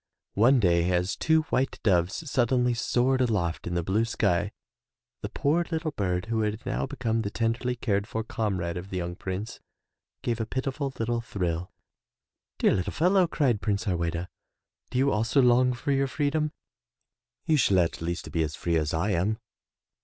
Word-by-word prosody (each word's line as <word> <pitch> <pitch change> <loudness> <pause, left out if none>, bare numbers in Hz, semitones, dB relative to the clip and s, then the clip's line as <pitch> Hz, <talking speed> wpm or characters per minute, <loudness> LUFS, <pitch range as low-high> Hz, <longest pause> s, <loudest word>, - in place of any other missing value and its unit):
One 125 +6 +5
day 85 -3 +3
as 90 +2 +1
two 160 0 +3
white 130 +1 0
doves 95 - +1
suddenly 125 -1 +2
soared 125 +3 +1
aloft 100 -11 0
in 85 - -2
the 85 - 0
blue 100 +6 +1
sky 100 -3 0 0.7
the - - -4
poor 160 +5 +1
little 160 -1 -2
bird 90 -7 -1
who 115 -1 -1
had 105 +1 -2
now - - -1
become 120 -5 -1
the 100 - -2
tenderly 115 +3 -1
cared 100 -4 -1
for 110 - -3
comrade 95 -7 -2
of 90 +2 -7
the 95 - -4
young 90 0 -3
Prince, 95 +4 -5 0.6
gave 120 -1 -1
a 110 - -3
pitiful 135 +3 -2
little 115 0 -1
thrill. 90 -6 -3 0.9
"Dear - - +3
little 90 - -1
fellow," 180 +2 +3
cried 130 -10 +1
Prince 105 0 0
Harweda, 85 -3 -1 0.6
"do 125 - -3
you 135 +2 +3
also 115 +6 +2
long 125 0 +5
for 135 +4 -2
your 135 0 +2
free 145 +1 0
dom? 155 0 0 0.9
You 155 - +3
shall 100 -8 +3
at 85 -2 +1
least 85 +1 -4
be 85 - 0
as 75 -1 -2
free 85 -1 0
as 75 0 0
I 95 +6 0
am.' 100 +4 +1
110 Hz, 175 wpm, -27 LUFS, 90-130 Hz, 0.9 s, One